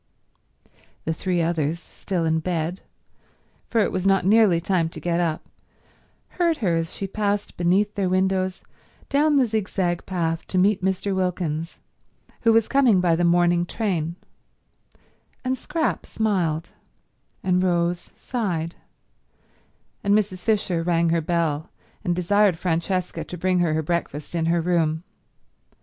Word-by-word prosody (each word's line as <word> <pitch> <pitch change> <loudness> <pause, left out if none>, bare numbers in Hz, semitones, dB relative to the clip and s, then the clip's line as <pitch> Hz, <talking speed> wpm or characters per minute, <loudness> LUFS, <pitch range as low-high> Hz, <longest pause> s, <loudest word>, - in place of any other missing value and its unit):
The 160 - 0
three 175 +1 -1
others, 165 -1 0
still 180 -1 -4
in 160 0 +2
bed, 170 +1 -2 0.9
for 230 - +2
it - - +1
was 185 +1 -1
not 195 -2 +3
nearly 205 -4 +5
time 170 -1 0
to - - -9
get 175 0 0
up, 165 -3 -1 0.9
heard 340 -3 +3
her 190 - +1
as 165 0 -2
she 195 - -3
passed 205 0 -2
beneath 190 +4 +2
their 195 -3 0
windows 185 0 0 0.5
down 295 +2 +3
the 270 -2 +5
zigzag 190 -5 -1
path 165 -3 -2
to 185 - -2
meet 190 +1 +3
Mr. 190 +1 0
Wilkins, 170 -3 -2 0.6
who 230 - +4
was 225 -1 +4
coming 255 -8 +4
by 175 -2 +3
the 175 - 0
morning 175 0 +3
train, 175 -4 -2 1.3
and 260 0 +1
Scrap 320 +5 -2
smiled, 175 -7 -1 0.7
and 180 -1 +2
Rose 175 -1 0
sighed, 180 -9 -3 1.3
and 200 0 +3
Mrs. 205 -3 0
Fisher 200 -5 0
rang 170 0 +2
her 165 0 +2
bell 160 -1 -1 0.3
and 175 -4 0
desired 195 +1 +3
Francesca 180 +1 -1
to 180 - -8
bring 185 +1 +1
her 165 -3 +2
her 160 - 0
breakfast 155 -2 -3
in 165 -1 0
her 170 0 +2
room. 165 -2 +1
180 Hz, 140 wpm, -24 LUFS, 165-200 Hz, 1.3 s, nearly